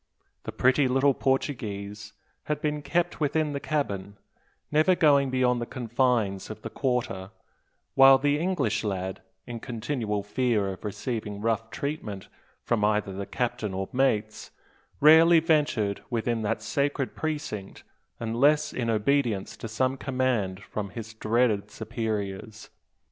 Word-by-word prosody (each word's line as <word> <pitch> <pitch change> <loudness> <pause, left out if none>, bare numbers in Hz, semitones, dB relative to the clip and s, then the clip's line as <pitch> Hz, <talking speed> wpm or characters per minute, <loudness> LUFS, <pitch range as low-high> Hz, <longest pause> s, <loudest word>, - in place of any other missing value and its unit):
The - - -4
pretty 130 +2 +3
little 135 +2 +3
Portuguese 105 -7 -2 0.3
had 150 -1 -1
been 150 0 -1
kept 175 +3 -1
within 150 0 0
the 140 - -2
cabin, 100 -11 -3 0.5
never 155 +5 +4
going 140 -5 +4
beyond 125 -1 +1
the 120 - -3
confines 120 -5 0
of - - -8
the - - -6
"quarter"; 115 -7 -2 0.6
while 135 0 +8
the 145 +2 +1
English 150 - 0
lad, 95 -2 -3 0.2
in 120 -1 -6
continual 115 -3 -3
fear 105 -2 0
of 95 - -13
receiving 105 0 -4
rough 115 +1 -1
treatment 115 -9 -5 0.3
from 115 -3 0
either 105 -2 +1
the 100 +1 -5
captain 120 -6 -2
or 95 0 -3
mates, 110 -5 0 0.5
rarely 160 +3 +7
ventured 145 - +1
within 115 -1 -1
that 110 0 -2
sacred 140 +2 -1
precinct 150 -11 -4 0.4
unless 145 +7 +2
in 120 -2 -2
obedience 115 -2 +1
to - - -6
some 130 +4 0
command 125 -8 -1
from 100 -1 -5
his 115 +3 -8
dreaded 110 -2 +1
superiors. 110 -1 -5
120 Hz, 130 wpm, -27 LUFS, 105-140 Hz, 0.6 s, while